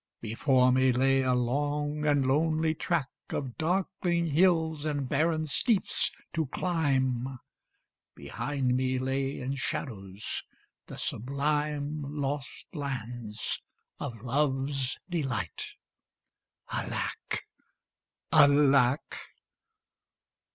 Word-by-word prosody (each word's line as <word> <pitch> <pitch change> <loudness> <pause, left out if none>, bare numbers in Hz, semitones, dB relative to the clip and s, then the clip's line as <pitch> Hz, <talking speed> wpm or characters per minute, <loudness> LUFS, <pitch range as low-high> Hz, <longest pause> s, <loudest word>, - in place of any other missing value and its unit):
Before 125 +3 +3
me 130 0 +4
lay 135 +2 +3
a 130 -1 +2
long 145 +4 0
and 145 -2 +3
lonely 155 +3 +2
track 160 -3 -1 0.2
Of 130 -4 -3
darkling 175 0 +1
hills 160 -2 +3
and 145 -3 -1
barren 155 +3 +1
steeps 195 - +2 0.2
to 160 -3 0
climb; 135 -6 0 0.8
Behind 135 -4 -1
me 130 0 +1
lay 135 +1 -1
in 130 +1 -2
shadows 110 - -4 0.4
the - - -8
sublime 145 +3 -1 0.2
Lost 140 0 -3
lands 120 - -4 0.4
of 120 -6 -6
Love's 135 0 0
delight. 135 - -2 1.0
Alack! - - -3 0.9
Alack! 140 -2 +5
140 Hz, 90 wpm, -29 LUFS, 130-150 Hz, 1.0 s, Alack